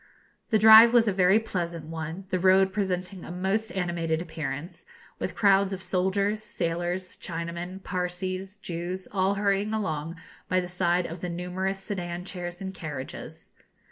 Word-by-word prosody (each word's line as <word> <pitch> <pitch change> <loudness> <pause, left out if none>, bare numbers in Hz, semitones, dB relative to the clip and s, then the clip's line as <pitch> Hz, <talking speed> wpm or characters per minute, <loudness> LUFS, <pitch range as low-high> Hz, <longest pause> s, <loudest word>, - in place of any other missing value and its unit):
The 220 - +4
drive 220 +2 +9
was 235 -2 +5
a 205 - +2
very 185 +2 +5
pleasant 170 -7 -3
one, 160 +3 -6
the 185 - +1
road 190 +1 +4
presenting 185 -2 -2
a - - -9
most 195 +5 -1
animated 170 -3 -1
appearance, 160 0 -5 0.4
with - - -3
crowds 200 -1 +4
of 190 - -5
soldiers, 200 +3 0
sailors, 175 -2 -2
Chinamen, 170 +2 -5
Parsees, 185 +2 -3
Jews, 175 +2 -4
all 195 0 +1
hurrying 200 +1 +1
along 165 -5 -2 0.3
by 185 - +3
the 180 - -3
side 180 0 +1
of 170 +1 -7
the 180 - -3
numerous 180 +3 -2
sedan 180 -3 -5
chairs 175 -1 -6
and 190 0 -5
carriages. 150 -7 -7
185 Hz, 150 wpm, -27 LUFS, 175-195 Hz, 0.4 s, drive